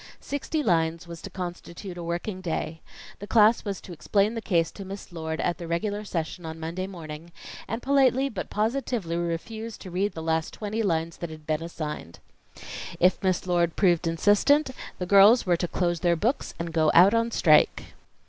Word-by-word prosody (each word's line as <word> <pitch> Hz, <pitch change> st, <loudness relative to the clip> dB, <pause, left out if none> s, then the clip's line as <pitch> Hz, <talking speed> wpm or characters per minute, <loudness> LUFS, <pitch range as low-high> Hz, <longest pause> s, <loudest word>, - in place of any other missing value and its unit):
Sixty 295 Hz, +2 st, -3 dB
lines 165 Hz, -4 st, +1 dB
was 170 Hz, -1 st, -8 dB
to -, -, -7 dB
constitute 180 Hz, 0 st, -7 dB
a 175 Hz, -, -7 dB
working 175 Hz, +3 st, -4 dB
day. 160 Hz, -2 st, -3 dB, 0.4 s
The 205 Hz, -, -8 dB
class 220 Hz, +1 st, +5 dB
was 200 Hz, -3 st, -4 dB
to 180 Hz, -, -9 dB
explain 200 Hz, +6 st, +1 dB
the 230 Hz, -, -4 dB
case 170 Hz, -6 st, +1 dB
to 200 Hz, -, -9 dB
Miss 195 Hz, 0 st, -8 dB
Lord 160 Hz, -1 st, -4 dB
at 175 Hz, -, -1 dB
the 170 Hz, -, -6 dB
regular 205 Hz, +5 st, -2 dB
session 170 Hz, -1 st, -4 dB
on 160 Hz, 0 st, -6 dB
Monday 170 Hz, +4 st, -4 dB
morning, 165 Hz, -3 st, -9 dB, 0.4 s
and 225 Hz, +2 st, -4 dB
politely 270 Hz, -1 st, +3 dB
but 230 Hz, -, -5 dB
positively 220 Hz, -5 st, -1 dB
refuse 200 Hz, +7 st, -4 dB
to 185 Hz, -, -10 dB
read 195 Hz, +4 st, 0 dB
the 160 Hz, -, -6 dB
last 160 Hz, 0 st, -1 dB
twenty 215 Hz, +1 st, -3 dB
lines 165 Hz, -5 st, -1 dB
that 170 Hz, -, -5 dB
had 155 Hz, -1 st, -11 dB
been 155 Hz, +1 st, -1 dB
assigned. 150 Hz, -, -6 dB, 0.8 s
If 180 Hz, +1 st, +3 dB
Miss 185 Hz, -2 st, 0 dB
Lord 175 Hz, -2 st, +1 dB
proved 175 Hz, -3 st, +3 dB
insistent, 210 Hz, -, +3 dB, 0.3 s
the 180 Hz, -, -3 dB
girls 200 Hz, +6 st, +7 dB
were 175 Hz, -2 st, +3 dB
to 175 Hz, -, -1 dB
close 175 Hz, -1 st, 0 dB
their 175 Hz, 0 st, +2 dB
books 230 Hz, -, -1 dB
and 165 Hz, -1 st, -5 dB
go 160 Hz, -1 st, +3 dB
out 185 Hz, +5 st, +8 dB
on 230 Hz, 0 st, +2 dB
strike. 155 Hz, -8 st, +3 dB
180 Hz, 185 wpm, -26 LUFS, 165-210 Hz, 0.8 s, out